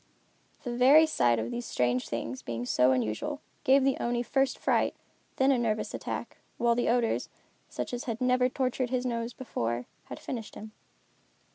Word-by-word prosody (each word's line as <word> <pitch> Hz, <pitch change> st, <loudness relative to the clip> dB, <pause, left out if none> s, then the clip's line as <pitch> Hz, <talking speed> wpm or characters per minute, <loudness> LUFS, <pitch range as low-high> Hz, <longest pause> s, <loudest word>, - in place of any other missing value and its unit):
The 245 Hz, -2 st, -3 dB
very 275 Hz, +6 st, +7 dB
sight 120 Hz, -, +2 dB
of 110 Hz, +1 st, -3 dB
these 240 Hz, -1 st, -4 dB
strange 125 Hz, 0 st, 0 dB
things 115 Hz, +2 st, -4 dB
being 120 Hz, 0 st, -4 dB
so 125 Hz, +1 st, +3 dB
unusual, 125 Hz, -, -1 dB, 0.2 s
gave 275 Hz, -1 st, +5 dB
the 270 Hz, 0 st, +2 dB
Oni 240 Hz, 0 st, 0 dB
first 270 Hz, +1 st, +1 dB
fright, -, -, +1 dB
and -, -, -37 dB
then 265 Hz, +1 st, +4 dB
a 260 Hz, -, +2 dB
nervous 220 Hz, -2 st, -1 dB
attack, -, -, -5 dB, 0.2 s
while 235 Hz, 0 st, +3 dB
the 240 Hz, 0 st, 0 dB
odors, 235 Hz, -1 st, +1 dB, 0.4 s
such -, -, -5 dB
as 245 Hz, -, -4 dB
had 230 Hz, -2 st, -3 dB
never 250 Hz, 0 st, +3 dB
tortured 255 Hz, -1 st, -1 dB
his 255 Hz, 0 st, -1 dB
nose 235 Hz, -1 st, -2 dB
before, 120 Hz, -, -3 dB, 0.2 s
had 125 Hz, -, -8 dB
finished 230 Hz, -4 st, -6 dB
him. 215 Hz, +1 st, -9 dB
240 Hz, 175 wpm, -29 LUFS, -, 0.4 s, very